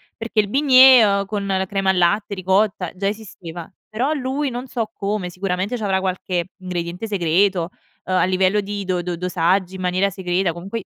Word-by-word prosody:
perché 225 -1 -2
il 205 - +3
bignè, 260 0 +7
ehm, 200 -1 +2
con 200 0 -4
la 190 -1 0
crema 195 0 -1
al 190 - +2
latte, 200 +4 +1
ricotta 190 0 +1
già 195 +1 -2
esisteva. 185 -6 -7 0.2
Però 250 +8 -1
lui, 275 0 -2
non 245 +1 -5
so 230 -3 -3
come, 200 -2 -3
sicuramente 185 +4 -2
c'avrà 195 -4 0
qualche 185 -2 -2
ingrediente 180 +1 -4
segreto, 185 -2 +1 0.4
ehm, 185 - -1
a - - +3
livello 185 +2 +2
di 200 0 -5
do 180 -1 -1
do 175 0 -4
dosaggi 180 +1 0
in 185 - -7
maniera 185 +2 +1
segreta, 180 -1 -1
comunque 195 +5 -6
195 Hz, 180 wpm, -21 LUFS, 180-210 Hz, 0.4 s, bignè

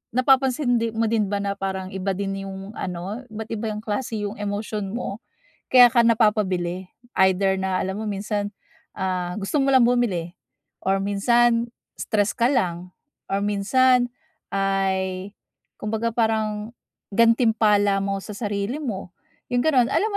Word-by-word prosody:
napapansin 255 -1 +3
di 230 -1 -2
mo 225 0 +1
din 215 -3 +2
ba 200 0 -2
na 200 0 -3
parang 190 -1 -3
iba 190 0 -2
din 195 0 -3
yung 195 +1 -7
ano, 185 +3 -5
iba't 220 0 -7
iba 225 0 -3
yung 215 0 -4
klase 225 +2 -3
yung 205 +1 -5
emosyon 205 0 -3
mo, 225 -3 -4 0.5
kaya 250 -1 +9
ka 235 0 +4
napapabili. 190 -6 +1 0.2
Either 190 0 +3
na 190 -1 0
alam 190 0 -2
mo - - -4
minsan, 205 +1 -2 0.5
ah, 185 -1 -2
gusto 270 +8 0
mo 275 - +2
lang 260 -3 +6
bumili, 190 -9 0 0.5
or 195 +1 +1
minsan, 230 +4 +2 0.2
stress 210 -1 0
ka 240 +2 +2
lang, 180 -8 -1 0.4
or 195 - +1
minsan 245 +5 +3 0.4
ay, 195 -1 -1 0.5
kumbaga 220 +2 -1
parang 220 -1 -1 0.4
gantimpala 220 -4 +3
mo 195 0 -1
sa 205 +1 -8
sarili 205 +7 -3
mo, 195 -7 -5 0.3
yung 245 -1 0
ganun. 260 -7 +4
Alam 435 +1 +2
210 Hz, 145 wpm, -23 LUFS, 195-230 Hz, 0.5 s, kaya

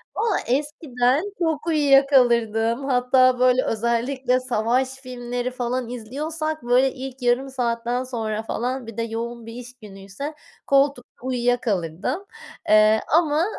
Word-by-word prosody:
Valla 440 -3 +1
eskiden 270 0 0 0.2
çok 320 -2 -1
uyuya 285 -4 +5
kalırdım. 235 -2 +2
Hatta 255 -1 +3
böyle 255 0 +4
özellikle 245 +3 0
savaş 250 +1 0
filmleri 250 -1 -5
falan 250 -1 -3
izliyorsak 310 +7 -4
böyle 250 +2 +3
ilk 265 0 -8
yarım 245 +2 +1
saatten 240 -1 -2
sonra 220 -4 -3
falan 245 +2 -3
bir 230 - -9
de - - 0
yoğun 230 +1 -5
bir 230 - -9
iş 245 +1 -9
günüyse 200 +8 -8 0.3
koltukta 275 -3 +1
uyuyakalırdım, 245 - -1 0.4
eee, 215 +1 +6
ama 315 0 +2
250 Hz, 125 wpm, -23 LUFS, 235-270 Hz, 0.4 s, eee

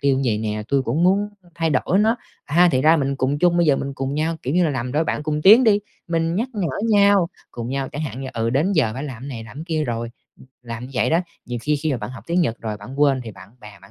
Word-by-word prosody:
tiêu 140 -1 +2
vầy 110 -4 +1
nè. 105 -1 -3
Tui 140 -1 +2
cũng 140 +8 0
muốn 200 +3 +3 0.3
thay 165 -1 0
đổi 185 +5 +1
nó." 220 +3 +3 0.3
A, 175 +4 +4
thì 130 - +2
ra 160 +3 +6
mình 140 -2 -1
cùng 135 +2 0
chung, 175 +1 +3
bây 170 -1 +3
giờ 140 - +4
mình 140 0 -4
cùng 135 0 -3
nhau, 160 +2 -1
kiểu 135 +5 -2
như 180 - +4
là, 160 - +1
làm 125 -2 -3
đôi 155 +2 +1
bạn 150 - -2
cùng 150 0 -2
tiến 220 +6 +8
đi. 210 -2 +4 0.3
Mình 165 0 0
nhắc 230 +7 -1
nhở 200 -7 -1 0.2
nhau, 200 -4 +4 0.2
cùng 120 0 -6
nhau 135 0 -2
chẳng 145 - -5
hạn 135 -4 -5
như, 135 - -5
ừ, 115 0 -1
đến 155 +11 +1
giờ 135 - +2
phải 135 +3 -5
làm 130 -4 -7
cái 140 - -7
này, 115 -5 -6
làm 115 +4 -13
cái 155 - -6
kia 155 -2 -1
rồi, 115 -2 -3 0.3
ừm, - - -16 0.2
làm 115 0 -6
như - - -13
vậy 125 - +1
đó. 165 - +3 0.3
Nhiều 120 0 -4
khi 150 0 +1
khi 150 0 -1
mà 125 - -2
bạn 105 +3 -6
học 130 - -10
tiếng 170 +2 +1
Nhật 120 -9 0
rồi 110 -2 -4
bạn 125 +7 -8
quên 140 -3 +4
thì 110 - -6
bạn 95 -1 -14
bè 105 -1 -12
bạn 100 - -16
140 Hz, 300 wpm, -22 LUFS, 125-165 Hz, 0.3 s, tiến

